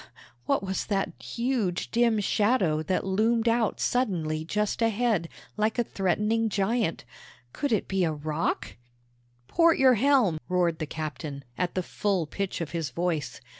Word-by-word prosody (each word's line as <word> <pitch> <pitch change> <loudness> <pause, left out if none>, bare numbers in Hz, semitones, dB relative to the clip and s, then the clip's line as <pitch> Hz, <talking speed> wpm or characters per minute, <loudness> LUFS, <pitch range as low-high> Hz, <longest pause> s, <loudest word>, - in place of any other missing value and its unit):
what - - +1
was 190 0 -3
that 195 -2 0
huge 235 -7 -2
dim 235 -2 +3
shadow 205 -6 +2
that 180 +5 -1
loomed 225 +4 +2
out 230 -1 +1
suddenly 165 -11 0
just 210 +7 -1
ahead, 225 -6 +1 0.3
like 215 +2 +1
a 240 - +3
threatening 210 +3 0
giant? 205 - 0 0.5
Could 285 - -2
it 215 - +1
be 190 -1 0
a 165 - +1
rock? 155 -1 -2 0.7
"Port 335 - +4
your 260 -1 +6
helm! 240 - +3
port!" - - -38
roared 175 -3 +1
the 155 - -3
captain, 145 -2 -5
at 180 +4 -2
the 185 - 0
full 195 -2 -1
pitch 195 +3 -4
of 165 - -4
his 165 -4 -2
voice. 165 +1 -2
195 Hz, 155 wpm, -27 LUFS, 165-230 Hz, 0.7 s, your